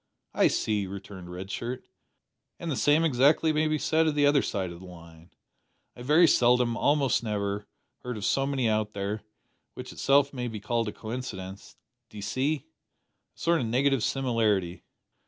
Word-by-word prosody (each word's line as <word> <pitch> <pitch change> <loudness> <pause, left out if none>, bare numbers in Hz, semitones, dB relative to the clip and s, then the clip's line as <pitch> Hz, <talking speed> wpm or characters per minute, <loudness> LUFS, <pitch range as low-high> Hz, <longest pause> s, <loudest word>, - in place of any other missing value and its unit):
"I - - +4
see," 105 -3 -1
returned 95 -2 -9
Red 95 +2 -7
Shirt; 120 +4 -5 0.7
"and 170 - -4
the - - 0
same, 145 +5 +3
exactly, 150 +2 +3
may 155 +1 +2
be 155 0 +1
said 160 +2 +2
of 155 - 0
the 145 -1 +3
other 145 -1 +4
side 95 -4 -3
o' 85 - -10
the 95 - -12
line. 85 -1 -14 0.7
I - - -11
very 155 +7 +5
seldom 125 -3 +3
almost 140 0 +2
never 105 -2 -3 0.3
heard 125 -2 -5
of 100 - -4
so 135 0 +1
many 135 -4 0
out 110 -1 0
there; 100 +2 -3 0.5
which - - -8
itself 140 +1 +3
may 125 -2 -3
be 110 -2 -5
called 115 +2 -1
a - - -2
coincidence, 105 -5 -7 0.3
d'ee 105 - -9
see? 135 +8 -1 0.7
a - - -23
sort 170 -1 +2
of 120 - -2
negative 135 +2 +2
similarity." 115 -9 0
120 Hz, 175 wpm, -27 LUFS, 100-140 Hz, 0.7 s, very